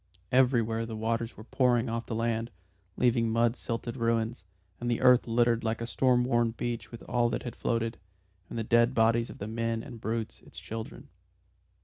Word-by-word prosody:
Everywhere 120 -3 +3
the 115 - -5
waters 115 +1 -2
were 110 - -9
pouring 125 0 +2
off 115 +1 -3
the 115 - -3
land, 115 0 -1 0.5
leaving 115 -2 +3
mud 115 +1 +2
silted 115 0 -4
ruins, 115 -2 0 0.4
and 120 - -2
the 120 - +1
earth 125 -1 +5
littered 120 0 +2
like 110 0 -1
a 115 - -3
storm 125 +1 +2
worn 120 -2 +2
beach 120 -1 -3
with 115 - -9
all 120 -1 +1
that - - -3
had 120 - -6
floated, 115 0 -1 0.5
and - - -6
the 115 - -1
dead 120 +3 +3
bodies 115 +1 +3
of - - -9
the 100 - -5
men 115 0 -2
and 115 -2 -10
brutes, 115 0 -3
its - - -12
children. 110 0 -7
115 Hz, 190 wpm, -29 LUFS, 115-120 Hz, 0.5 s, earth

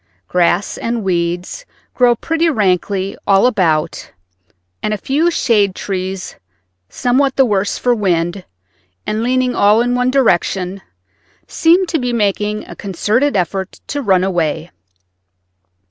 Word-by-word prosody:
Grass 180 +3 +1
and 230 -1 -2
weeds 175 - -2 0.3
grow 245 -1 +3
pretty 325 +7 0
rankly 195 - 0
all 195 +1 +4
about, 170 -9 0 0.7
and 215 0 -1
a - - -5
few 295 - +1
shade 210 - +1
trees, 190 -1 -5 0.5
somewhat 265 +2 +1
the 270 - +4
worse 205 -3 0
for 245 - +1
wind, 180 -3 -1 0.6
and 215 +1 -2
leaning 250 +1 +1
all 210 0 +4
in 245 +1 +1
one 250 0 +1
direction, 195 -7 +1 0.6
seem 345 +3 +3
to 330 -2 -1
be 250 -1 -2
making 210 -1 -1
a - - -9
concerted 210 +7 0
effort 190 +1 -3
to 285 - -3
run 190 -6 +2
away. 175 -3 -1
210 Hz, 130 wpm, -16 LUFS, 185-250 Hz, 0.7 s, all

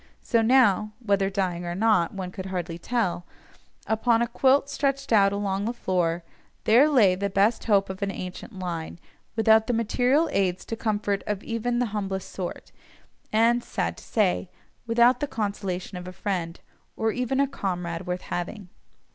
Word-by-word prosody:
So 230 - +2
now 220 -4 +4
(whether 200 -4 +1
dying 185 -3 -2
or 175 0 -4
not, 205 -4 +3
one 190 -2 -5
could 190 0 -7
hardly 175 -2 -4
tell), 200 -4 -1 0.6
upon 230 +1 +2
a - - -1
quilt 270 +3 +3
stretched 275 -2 -1
out 195 -2 +5
along 200 0 -1
the 235 - -1
floor, 175 -6 -1 0.4
there 245 +8 +5
lay 225 -11 +5
the 200 +2 -2
best 200 +4 +2
hope 200 -3 +3
of 190 +1 -7
an 200 - 0
ancient 190 +3 -7
line, 170 -3 -5 0.4
without 220 0 +4
the 245 - +1
material 250 +7 +2
aids 185 -5 0
to 225 - -4
comfort 205 -3 -1
of 210 -1 -2
even 240 +1 -2
the 245 - +2
humblest 195 -2 -3
sort, 180 -2 -6 0.6
and 235 +2 +3
(sad - - -2
to - - -12
say) 190 -4 0 0.4
without 235 +2 +4
the 290 - -1
consolation 195 -5 -3
of 180 - -9
a 185 - -7
friend, 180 -3 -3 0.4
or 220 0 +1
even 250 +3 -1
a 280 - +3
comrade 180 -9 -4
worth 180 0 -2
having. 180 +2 -5
205 Hz, 170 wpm, -26 LUFS, 185-235 Hz, 0.6 s, out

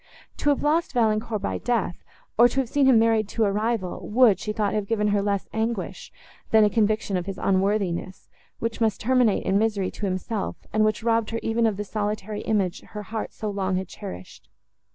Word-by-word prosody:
To 290 - +1
have 285 - +1
lost 310 +1 +1
Valancourt 220 -2 +1
by - - -2
death, 230 -7 -1 0.3
or 240 +2 +7
to 250 +3 -2
have 250 - -6
seen 280 0 +3
him 255 -3 +6
married 225 -2 +3
to 225 - 0
a 200 - +1
rival, 210 -3 -2
would, 225 -4 +5
she 210 - -3
thought, 210 -2 -1
have 210 -2 -1
given 210 -1 +1
her 205 0 +2
less 200 -1 -1
anguish, 220 -2 -3 0.4
than 220 -1 +6
a 210 - +3
conviction 215 -3 +1
of 180 +1 -4
his 195 - -4
unworthiness, 190 -1 0 0.3
which 230 0 -4
must 220 -3 +1
terminate 245 -2 +2
in 195 +1 +2
misery 210 -4 0
to 205 - -4
himself, 185 0 -3
and 215 0 +3
which 215 0 0
robbed 230 -1 +1
her 230 - -2
even 230 +1 +2
of 210 -3 -1
the 205 - -2
solitary 210 0 -3
image 200 -5 0
her 210 -1 -8
heart 220 +2 -5
so 215 -1 -4
long 190 -2 -1
had 185 0 -2
cherished. 90 - -10
215 Hz, 205 wpm, -25 LUFS, 200-225 Hz, 0.4 s, or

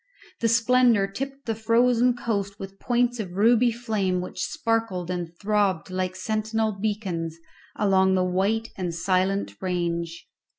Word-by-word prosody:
The 230 - +2
splendour 230 -2 +4
tipped 270 +7 -6
the 225 - 0
frozen 235 +2 +3
coast 200 -4 -2
with 195 0 -9
points 245 0 +1
of 185 -5 -4
ruby 230 +4 +4
flame 215 -6 -1
which 180 0 -5
sparkled 225 - -1
and 175 -2 -3
throbbed 200 -4 0
like 185 0 -2
sentinel 220 +3 -1
beacons 195 -6 -3 0.4
along 190 -2 +3
the 185 -1 +2
white 200 +5 0
and 175 -3 -3
silent 185 +3 0
range. 170 -2 -2
200 Hz, 135 wpm, -25 LUFS, 185-230 Hz, 0.4 s, splendour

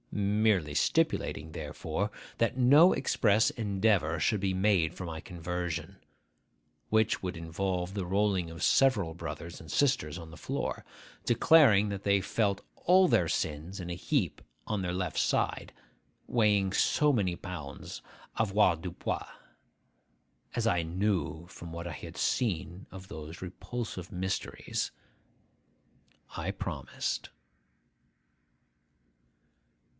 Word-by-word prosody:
Merely 100 -6 +2
stipulating, 80 +2 +1
therefore, 80 +6 -3 0.3
that 115 +2 +1
no 145 +8 +7
express 110 0 +3
endeavour 100 -6 +1
should 105 +5 +1
be 95 -1 +1
made 95 -4 +2
for 95 - -6
my 80 -2 -5
conversion,—which 90 - -4
would 90 -1 -3
involve 90 +2 -2
the 100 -3 -2
rolling 95 -2 +1
of 80 0 -9
several 105 -12 +3
brothers 85 0 -7
and 80 - -10
sisters 130 - +1
on 85 -2 -9
the - - -11
floor, - - -3 0.4
declaring 120 -5 +5
that 100 -1 -4
they 100 0 +3
felt 100 0 0 0.2
all 185 +1 +5
their 85 - +3
sins 80 +7 -2
in 90 -1 -5
a - - -2
heap 95 - -1 0.3
on 105 -2 -1
their 90 -1 -1
left 90 -2 -2
side, - - 0 0.6
weighing 105 -4 +2
so 150 +6 +3
many 95 -7 +1
pounds 75 -8 -7 0.4
avoirdupois, 95 -5 +1 1.3
as - - 0
I 90 - +3
knew 85 -2 -1
from 85 -2 -10
what 85 +1 -5
I 85 - -5
had - - -9
seen 95 -5 -1
of 95 0 -10
those 80 -2 -8
repulsive 95 0 -6
mysteries,—I 95 +1 -6
promised. - - -4
95 Hz, 115 wpm, -30 LUFS, 85-105 Hz, 1.3 s, no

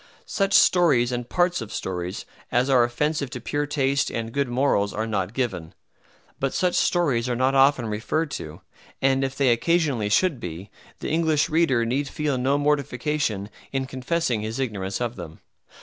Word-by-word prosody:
Such 195 -1 -1
stories 145 -9 +4
and 120 0 -4
parts 175 -4 +1
of 115 - -7
stories 90 0 -4 0.3
as 125 +3 +2
are 125 -2 +5
offensive 140 +4 -1
to 125 - -6
pure 145 +5 -2
taste 140 -1 +1
and 115 0 -4
good 140 +2 0
morals 120 -5 +1
are 110 - -1
not 100 -3 -2
given. 110 -11 -3 0.6
But 135 0 -1
such 180 -1 +1
stories 135 -9 +1
are 120 - 0
not 130 +2 +2
often 135 -2 +4
referred 115 +9 -2
to, 75 - -7 0.4
and 135 0 +2
if 135 0 -2
they 135 -3 +3
occasionally 135 -3 +1
should 160 - +2
be, 90 -1 -7 0.3
the - - -3
English 160 -2 +2
reader 145 -8 +2
need 135 +5 -1
feel 145 -2 -2
no 135 +3 +2
mortification 145 -6 -1 0.2
in 135 -1 -1
confessing 130 -2 -1
his 110 +1 -4
ignorance 100 -7 -3
of 120 -1 -3
them. 80 0 -9
130 Hz, 170 wpm, -24 LUFS, 115-145 Hz, 0.6 s, are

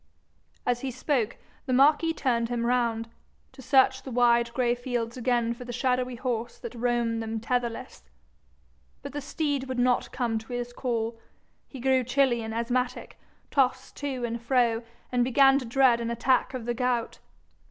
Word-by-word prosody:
As 245 0 0
he 270 - -2
spoke 250 -2 -1 0.3
the 255 - 0
marquis 295 +5 +4
turned 235 -7 0
him 240 -1 -1
round, 235 -2 +1 0.4
to 265 - -13
search 265 0 +4
the - - -8
wide 235 -1 +3
gray 245 -2 +2
fields 240 -2 -3
again 240 -2 +1
for 235 - -9
the 245 - -7
shadowy 250 0 0
horse 240 -1 -3
that - - -8
roamed 235 -1 0
them 225 0 -3
tetherless. 235 - -3 0.9
But - - -7
the 290 - -3
steed 285 -1 -2
would 260 -1 -4
not 245 0 +2
come 235 -3 -1
to 225 +3 -10
his 245 0 -4
call; 230 -2 -2 0.5
he 270 - -10
grew 260 0 +2
chilly 255 -1 +2
and 220 0 -5
asthmatic, 245 +2 -2 0.3
tossed 265 -3 +1
to 265 -4 -3
and 235 0 -4
fro, 235 -2 +2 0.3
and 245 -1 +2
began 270 +2 +5
to 255 - -7
dread 245 0 +3
an 230 - -2
attack 250 +2 +1
of 245 -3 -5
the 240 - -1
gout. 245 -1 -1
245 Hz, 170 wpm, -27 LUFS, 235-260 Hz, 0.9 s, began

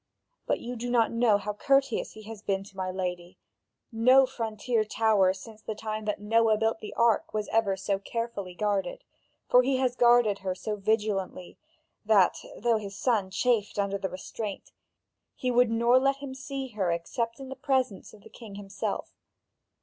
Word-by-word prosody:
But - - +1
you 245 +1 -6
do 245 +1 -4
not 235 -2 +3
know 230 -3 +3
how 210 +1 -4
courteous 275 +3 +1
he 215 - -12
has 220 -1 -9
been 195 -2 -1
to 195 0 -16
my 185 -1 -3
lady: 180 -1 -4 0.5
no 255 +4 +6
frontier 230 -2 -1
tower 215 -3 +3
since 215 +3 -10
the 220 - -5
time 215 0 -5
that 210 - -2
Noah 220 +1 +3
built 225 +1 0
the 210 - -8
ark 230 -2 +2
was 210 -1 -1
ever 210 -4 +1
so 195 0 -1
carefully 200 -3 -5
guarded, 200 -2 -1 0.4
for 250 - +6
he 260 +1 +1
has 255 -1 0
guarded 240 -4 +4
her 185 -1 -3
so 210 +3 -4
vigilantly 205 -3 -2 0.4
that, - - +4 0.2
though 235 -2 +2
his 200 -2 -7
son 215 -7 +1
chafed 210 +1 0
under 200 -1 0
the 190 - -2
restraint, 195 +3 -6 0.6
he 255 -2 -1
would 245 -1 +4
nor 235 +2 +4
let 275 +1 +2
him 275 -1 -8
see 270 0 -5
her 205 -6 -1
except 230 +8 -3
in 270 -1 -8
the 265 - -6
presence 260 -9 -1
of 210 -2 -17
the - - -14
king 220 -4 -11
himself. 200 0 -4
220 Hz, 180 wpm, -28 LUFS, 200-240 Hz, 0.6 s, no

